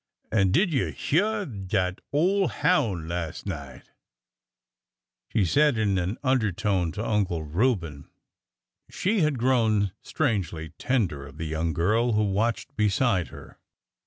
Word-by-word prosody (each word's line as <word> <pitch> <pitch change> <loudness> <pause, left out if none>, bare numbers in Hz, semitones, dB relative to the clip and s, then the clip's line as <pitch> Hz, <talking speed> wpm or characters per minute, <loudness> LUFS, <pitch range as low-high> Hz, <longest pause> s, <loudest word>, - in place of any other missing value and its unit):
An' 95 -4 +3
did 175 - +2
you 130 - 0
hyeah 205 +6 0
dat 95 - -2
ole 185 +7 +2
houn' 110 - +1
las' 85 -1 -4
night? 70 -9 -7 0.7
" - - -65
She 105 -4 +2
said 145 - +3
it - - +1
in 100 -3 +1
an 90 +6 -2
undertone 100 - +1
to 110 - -4
Uncle 95 -7 0
Reuben. 85 - -1 0.8
She 205 +3 0
had 150 -5 +2
grown 115 -5 +2
strangely 95 - -2
tender 90 - -1
of 70 +2 -14
the 80 - -4
young 80 +1 -1
girl 110 +9 +2
who 105 0 +2
watched 110 +7 -1
beside 105 -3 +2
her. - - -13
105 Hz, 135 wpm, -26 LUFS, 85-130 Hz, 0.8 s, An